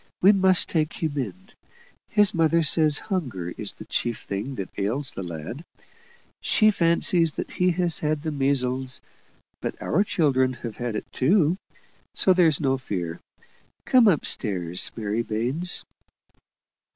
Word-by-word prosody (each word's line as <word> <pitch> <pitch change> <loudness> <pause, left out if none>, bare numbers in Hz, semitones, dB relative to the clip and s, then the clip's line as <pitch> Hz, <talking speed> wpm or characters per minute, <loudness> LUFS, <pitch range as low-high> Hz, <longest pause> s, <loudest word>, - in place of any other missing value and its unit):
We 195 - +6
must 190 -2 +4
take 155 -2 -1
him 155 -3 -3
in; 185 - -5 0.6
his 205 -3 +4
mother 165 0 +2
says 155 -1 +6
hunger 125 - -4
is - - -5
the - - -12
chief 120 -2 -2
thing 105 +8 -5
that 95 -5 -6
ails 120 +8 -2
the - - -6
lad. 85 - -7 0.8
She 215 0 +3
fancies 170 -2 +3
that - - -6
he 180 0 +1
has 175 -1 +1
had 150 0 -2
the 160 - -2
measles; 130 -2 +1 0.6
but - - -5
our 190 +6 +1
children 135 -10 +1
have 115 -3 -8
had 120 -2 -4
it - - -4
too, 170 +4 +2 0.6
so 190 - +3
there's 165 -5 +3
no 135 -2 0
fear. 85 -9 -5 0.7
Come 250 -3 +5
up 170 -8 +2
stairs, 90 -5 -2
Mary 110 0 -2
Baines." 125 +11 -2
145 Hz, 145 wpm, -24 LUFS, 115-170 Hz, 0.8 s, We